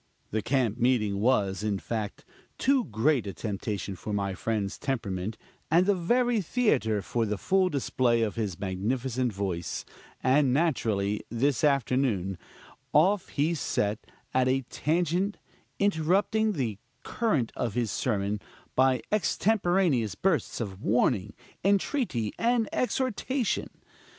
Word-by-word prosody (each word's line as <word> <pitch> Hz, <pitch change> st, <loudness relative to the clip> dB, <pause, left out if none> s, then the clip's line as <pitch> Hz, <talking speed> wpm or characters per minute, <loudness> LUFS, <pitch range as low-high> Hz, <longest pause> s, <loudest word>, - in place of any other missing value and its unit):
The 110 Hz, -, 0 dB
camp 120 Hz, -1 st, 0 dB
meeting 110 Hz, -5 st, +2 dB
was, 105 Hz, -5 st, +2 dB
in 105 Hz, -2 st, 0 dB
fact, 110 Hz, 0 st, -4 dB, 0.3 s
too 265 Hz, -2 st, +2 dB
great 115 Hz, +2 st, +1 dB
a 100 Hz, -, -4 dB
temptation 100 Hz, 0 st, -3 dB
for 105 Hz, -, -6 dB
my 100 Hz, -1 st, -1 dB
friend's 105 Hz, 0 st, -2 dB
temperament, 110 Hz, -6 st, -3 dB, 0.3 s
and 170 Hz, +4 st, +4 dB
the 205 Hz, -, +4 dB
very 235 Hz, +5 st, +2 dB
theater 130 Hz, -, +1 dB
for 115 Hz, +5 st, -1 dB
the 105 Hz, 0 st, -1 dB
full 190 Hz, -, +2 dB
display 125 Hz, -5 st, +1 dB
of 105 Hz, -, -1 dB
his 105 Hz, -6 st, -3 dB
magnificent 120 Hz, +6 st, -1 dB
voice; 95 Hz, -4 st, -3 dB, 0.4 s
and 135 Hz, +1 st, +4 dB
naturally, 110 Hz, -9 st, +1 dB
this 120 Hz, +2 st, 0 dB
afternoon, 125 Hz, -, +1 dB, 0.5 s
off 185 Hz, +6 st, +4 dB
he 155 Hz, +4 st, +1 dB
set 105 Hz, -8 st, -1 dB, 0.3 s
at 130 Hz, 0 st, +3 dB
a 130 Hz, +1 st, +2 dB
tangent, 175 Hz, +5 st, 0 dB, 0.4 s
interrupting 200 Hz, +4 st, +2 dB
the 115 Hz, -, -2 dB, 0.2 s
current 180 Hz, -, 0 dB
of 115 Hz, -4 st, -2 dB
his 120 Hz, -4 st, 0 dB
sermon 105 Hz, -3 st, -1 dB, 0.4 s
by 130 Hz, -1 st, +3 dB
extemporaneous 180 Hz, -, +2 dB
bursts 165 Hz, -, 0 dB
of 100 Hz, -4 st, -5 dB
warning, 105 Hz, -2 st, +1 dB, 0.3 s
entreaty 195 Hz, -, +1 dB
and 235 Hz, -1 st, +2 dB
exhortation. 255 Hz, 0 st, -1 dB
125 Hz, 125 wpm, -28 LUFS, 105-175 Hz, 0.5 s, and